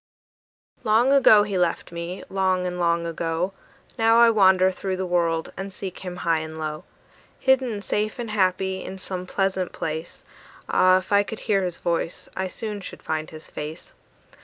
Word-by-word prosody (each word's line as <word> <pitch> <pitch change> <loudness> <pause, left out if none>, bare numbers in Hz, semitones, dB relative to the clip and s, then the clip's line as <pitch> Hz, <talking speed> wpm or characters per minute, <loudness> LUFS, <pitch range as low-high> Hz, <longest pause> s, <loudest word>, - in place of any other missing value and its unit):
Long 230 +5 +4
ago 220 -7 +7
he 200 -3 -2
left 175 -1 0
me, 170 +2 -5
long 185 -1 +1
and 180 0 -3
long 170 -1 +1
ago: 165 +2 -2 0.5
Now 225 0 +5
I 235 0 +7
wander 190 -3 +5
through 190 0 -3
the 190 - -2
world 170 -2 0
and 195 +1 -6
seek 190 -1 -7
him 180 -1 -6
high 165 -1 +3
and 160 0 -7
low; 155 -1 -4 0.5
Hidden 255 -6 +2
safe 210 +2 -1
and 235 -3 -4
happy, 190 -1 0
in 190 - -7
some 185 -1 -6
pleasant 190 -1 -1
place, 160 +1 -5 0.4
Ah, 185 0 +5
if 185 +1 -6
I 200 0 +6
could 215 +2 -6
hear 200 -2 +1
his 180 -2 -3
voice, 170 0 -2
I 190 0 -1
soon 210 +2 -5
should - - -10
find 155 0 -2
his 155 0 -11
face. 155 - -8
185 Hz, 175 wpm, -24 LUFS, 170-205 Hz, 0.5 s, ago